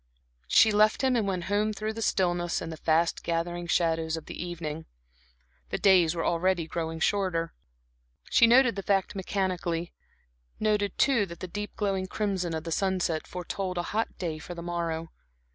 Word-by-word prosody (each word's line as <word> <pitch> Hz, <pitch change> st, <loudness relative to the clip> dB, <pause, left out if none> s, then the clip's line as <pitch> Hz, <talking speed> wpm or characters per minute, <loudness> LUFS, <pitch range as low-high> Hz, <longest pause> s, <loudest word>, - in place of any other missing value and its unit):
She 220 Hz, -, +6 dB
left 215 Hz, +4 st, +3 dB
him 260 Hz, -1 st, +3 dB
and 220 Hz, -4 st, +1 dB
went 185 Hz, -3 st, -1 dB
home 205 Hz, +3 st, 0 dB
through 215 Hz, +1 st, -3 dB
the 225 Hz, -, -6 dB
stillness 175 Hz, -4 st, +1 dB
and 165 Hz, -, -6 dB
the 160 Hz, -, -7 dB
fast 165 Hz, +2 st, +1 dB
gathering 175 Hz, +1 st, -2 dB
shadows 165 Hz, -1 st, +1 dB
of 160 Hz, -, -8 dB
the -, -, -6 dB
evening. 160 Hz, -3 st, -5 dB, 0.8 s
The -, -, -1 dB
days 180 Hz, -4 st, +4 dB
were 165 Hz, -, -2 dB
already 175 Hz, 0 st, +1 dB
growing 165 Hz, 0 st, -4 dB
shorter. 170 Hz, -3 st, 0 dB, 0.8 s
She 235 Hz, -, +6 dB
noted 240 Hz, -1 st, +5 dB
the 195 Hz, -, -3 dB
fact 195 Hz, -1 st, +1 dB
mechanically; 180 Hz, -3 st, -2 dB, 0.7 s
noted 210 Hz, -2 st, 0 dB
too 235 Hz, -8 st, +3 dB
that 170 Hz, -1 st, -10 dB
the 185 Hz, -, -5 dB
deep 205 Hz, +3 st, -6 dB
glowing 195 Hz, -2 st, -1 dB
crimson 190 Hz, -5 st, -2 dB
of 160 Hz, -, -4 dB
the 165 Hz, -, -5 dB
sunset 185 Hz, -3 st, 0 dB
foretold 180 Hz, +1 st, -4 dB
a 175 Hz, -, 0 dB
hot 225 Hz, +2 st, -1 dB
day 160 Hz, -4 st, -3 dB
for 175 Hz, +2 st, -8 dB
the 170 Hz, -, -7 dB
morrow. 165 Hz, -1 st, -3 dB
180 Hz, 175 wpm, -28 LUFS, 165-200 Hz, 0.8 s, She